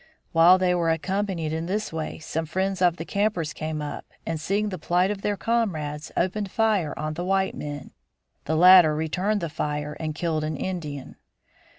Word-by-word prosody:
While 170 +3 +7
they 185 -1 +2
were 170 -2 +1
occupied 190 +4 -1
in 160 +1 -2
this 210 0 -2
way 160 -1 -4
some 160 0 -4
friends 190 +2 -1
of 175 -1 +3
the 165 - -5
campers 200 -6 -1
came 155 -1 -4
up 145 - -5 0.2
and 160 -2 -3
seeing 205 +5 0
the 185 -3 -5
plight 180 +5 +1
of 200 -1 -5
their 205 0 -1
comrades 165 -9 -1
opened 195 +3 0
fire 210 -7 +1
on 155 0 -3
the 175 +3 -4
white 190 +1 +1
men. 145 -2 -7 0.5
The 160 - 0
latter 175 -2 +8
returned 185 +7 -1
the 170 - -1
fire 150 -1 -3
and 155 -2 -3
killed 160 -1 -1
an 155 -1 -3
Indian. 150 -6 -5
170 Hz, 185 wpm, -25 LUFS, 155-190 Hz, 0.5 s, latter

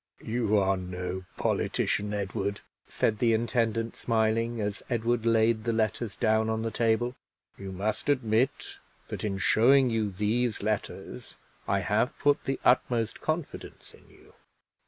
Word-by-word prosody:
"You 110 -2 +1
are 95 -1 +2
no 90 0 -5
politician, 105 0 0
Edward," 100 0 -3 0.3
said 110 -2 0
the 115 -2 +3
intendant, 115 0 0
smiling, 115 0 0
as 105 -1 -3
Edward 115 -1 0
laid 115 -1 +3
the 115 0 0
letters 110 0 -1
down 110 0 +2
on 110 0 -1
the 115 - -2
table. 115 +2 +1 0.4
"You 95 -1 -7
must 100 +8 -2
admit 125 -1 0 0.3
that, - - -5
in 100 -2 -1
showing 125 +6 +4
you 110 -2 0
these 105 +3 -1
letters, 105 0 -4 0.3
I - - +1
have - - 0
put 145 0 +2
the 135 - -2
utmost 120 -3 +2
confidence 155 0 -5
in - - -19
you." - - -20
110 Hz, 140 wpm, -28 LUFS, 105-120 Hz, 0.4 s, showing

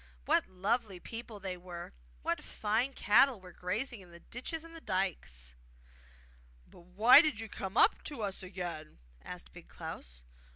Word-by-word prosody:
What - - +3
lovely 195 +1 -1
people 225 +1 -7
there 185 -2 -4
were, 175 -1 -7
and - - -16 0.3
what - - -1
fine 220 +6 0
cattle 245 +2 +5
were 185 -1 -12
grazing 205 +7 -3
in 180 - -14
the 170 0 -12
ditches 285 - -5
and 330 0 -11
dykes!' 70 - -2 1.1
'But - - -16
why 215 +10 +8
did 305 -9 0
you 225 - -5
come 195 0 -5
up - - +5
to 280 -7 -4
us 195 -2 -2
again?' 180 -4 -6 0.2
asked 60 0 -8
Big - - -12
Klaus. - - -8
195 Hz, 160 wpm, -33 LUFS, 180-235 Hz, 1.1 s, why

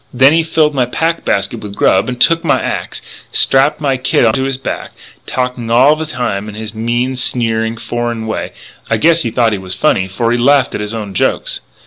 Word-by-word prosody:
Then 130 +3 +4
he 165 - +3
filled 160 -2 +1
my 130 -3 0
pack 165 +6 -1
basket 100 - -1
with 100 -1 -8
grub, 95 +6 +2
and 125 -1 -5
took 165 +5 +4
my 165 - +2
axe, - - -4 0.3
and - - -14
strapped 140 +3 +3
my 140 -3 0
kit 125 - +1
onto 115 +4 +2
his 135 -1 -1
back.... 135 - -6 0.2
And - - -36
talking 125 -2 -3
all 130 +6 +5
the 160 0 -5
time 105 -7 -3
in 105 - -9
his 110 -1 -6
mean, 120 +3 -1
sneery, 115 -3 0
foreign 120 0 -4
way 110 - -3
and - - -11 0.4
I 110 - +2
guess 165 +8 +3
he 120 - -1
thought 115 0 +1
he 105 - -2
was 95 -1 +3
funny, 95 - +1
for 115 +5 -1
he 120 - +1
laughed 140 +1 +3
at - - -3
his 105 +2 -4
own 105 -3 -6
jokes. - - 0
120 Hz, 230 wpm, -14 LUFS, 110-135 Hz, 0.4 s, all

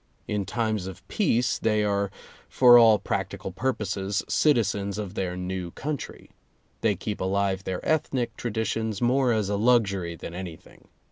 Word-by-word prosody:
In 105 -2 -2
times 110 -5 -1
of 95 - -10
peace 125 - +1
they 110 -1 +1
are 100 -1 0 0.4
for 125 -2 +7
all 110 -2 +7
practical 95 - -4
purposes 100 -2 -2
citizens 100 -8 +1
of 100 -3 -5
their 90 -3 -3
new 90 -1 -4
country. 145 - -6 0.5
They 110 -3 +2
keep 105 +3 -5
alive 95 0 0
their 95 -1 -4
ethnic 135 -5 0
traditions 110 -2 -2
more 125 +1 +2
as 110 -3 +1
a 100 0 -1
luxury 100 -7 +2
than 85 - -8
any 90 -2 -6
thing. - - -20
105 Hz, 150 wpm, -26 LUFS, 95-115 Hz, 0.5 s, for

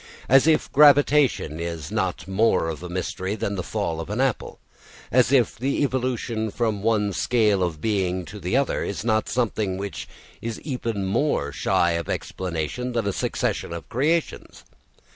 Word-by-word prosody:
As 135 +4 +5
if 160 -1 +2
gravitation 145 - +4
is 85 -3 -5
not - - -2
more 95 -3 +2
of 80 - -5
a 90 - -7
mystery 95 +2 -3
than 100 -1 -2
the 95 - -2
fall 90 -4 -3
of 80 - -8
an 105 +4 -3
apple, 135 -3 -1 0.5
as 125 0 +4
if 130 -5 +3
the 135 +4 -1
evolution 125 -4 -1
from 110 -2 -1
one 105 -2 +1
scale 105 -2 +2
of 85 -4 -1
being 95 -3 0
to 105 +3 -9
the 90 +7 0
other 140 - 0
is 100 +1 -4
not 110 -2 +1
something 110 -5 -1
which 100 0 -5 0.3
is 115 -1 -4
even 115 -8 -3
more 95 - 0
shy 85 +4 +1
of 85 -1 -3
explanation 95 +8 -3
than 115 -3 0
a 100 - 0
succession - - -2
of 85 -1 -6
creations. 155 +7 -1
105 Hz, 165 wpm, -24 LUFS, 90-125 Hz, 0.5 s, As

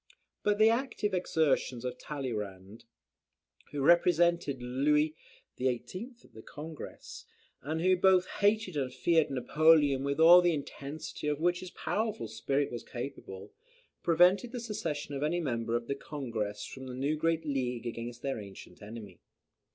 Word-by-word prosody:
But 205 0 +1
the 220 +1 +6
active 230 -4 -1
exertions 150 -8 0
of 125 - -3
Tralleyrand, 110 -6 -6 0.9
who 145 -1 -2
represented 170 -3 +3
Louis 150 +5 +1 0.4
XVIII. 130 - -3
at - - -22
the 110 - -11
Congress, 155 +5 -9 0.4
and 155 +4 -3
who 185 +1 +4
both 185 0 +4
hated 205 -3 +2
and 135 -3 -1
feared 160 +5 +2
Napoleon 145 +1 +4
with 140 +2 -1
all 170 +2 +9
the 175 -2 +2
intensity 145 +1 -6
of 150 -1 0
which 175 +2 +1
his 185 - -8
powerful 210 - -2
spirit 120 +6 -1
was 120 - -5
capable, 105 -6 -8 0.5
prevented 180 +7 +4
the 245 - -3
secession 165 -11 -4
of 140 - -4
any 160 +4 0
member 115 -7 -1
of 120 0 -1
the 140 - -2
Congress 115 -8 -4
from 130 0 -9
the 125 - -6
new 140 +4 0
great 165 +1 0
league 125 -4 -2
against 120 +1 -6
their 135 -4 -2
ancient 100 0 -11
enemy. 105 -4 -10
145 Hz, 150 wpm, -31 LUFS, 125-170 Hz, 0.9 s, all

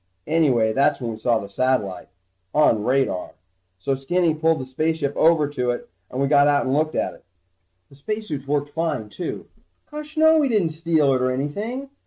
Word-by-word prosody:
Anyway 135 -9 +2
that's 140 +3 +2
when 120 -3 -3
we 110 - -7
saw 115 0 +2
the 100 - -6
satellite 100 -3 -1 0.5
on 115 -8 +4
radar. 130 -7 0 0.4
So 115 +9 -1
Skinny 165 +5 +1
pulled 160 +1 +1
the 130 - -5
spaceship 145 +2 -1
over 160 -2 +4
to 125 -4 -2
it 120 - -4 0.2
and 125 - -5
we 140 - +2
got 145 0 +5
out 145 -1 +2
and 130 - 0
looked 155 +2 0
at - - -1
it. - - -18 0.7
The - - -16
spacesuits 155 -3 -5
worked 145 0 0
fine, 150 -8 -2
too. 175 - -6 0.5
Gosh 300 +1 -8
no, 315 0 +6
we 285 -3 +2
didn't 200 -8 +1
steal 160 -3 +2
it 130 - 0
or 130 - +2
anything. 210 - -4
145 Hz, 190 wpm, -22 LUFS, 130-165 Hz, 0.7 s, no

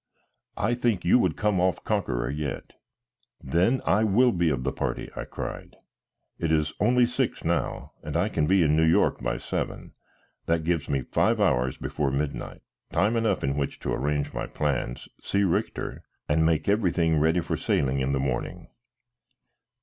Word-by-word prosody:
"I - - +1
think 120 -6 0
you 90 - +5
would 90 -8 +1
come 105 -4 +1
off 90 -3 +1
conqueror 70 - -1
yet." 75 -1 -5 0.7
"Then 90 - +1
I 105 +3 +3
will 115 +4 +4
be 85 -5 +1
of 65 -4 -1
the 70 - 0
party," - - -3
I - - -4
cried. - - -7 0.6
"It 85 -1 0
is 75 -1 +1
only 125 0 +4
six 120 - -2
now, - - -1
and 75 +1 -3
I 90 +4 +2
can 75 -8 0
be 95 0 +4
in 75 -1 +3
New 80 - +3
York 80 +1 +3
by - - -1
seven. - - -4 0.5
That 80 -1 +1
gives 80 -3 -1
me 70 -2 0
five - - +1
hours 65 +1 +2
before 70 -2 -2
midnight, 70 +2 -3 0.3
time 105 +7 +2
enough 115 -1 +1
in 70 0 0
which 70 -1 -3
to - - -2
arrange 70 +1 -1
my - - -3
plans, 65 -5 -2
see 100 - 0
Richter, 90 -4 -1 0.3
and 80 +2 +2
make 80 -2 +1
everything 90 -6 +2
ready 80 +3 +3
for 85 - -2
sailing 70 -1 0
in 65 +1 0
the 70 - 0
morning." 65 -2 -3
80 Hz, 175 wpm, -26 LUFS, 70-95 Hz, 0.7 s, you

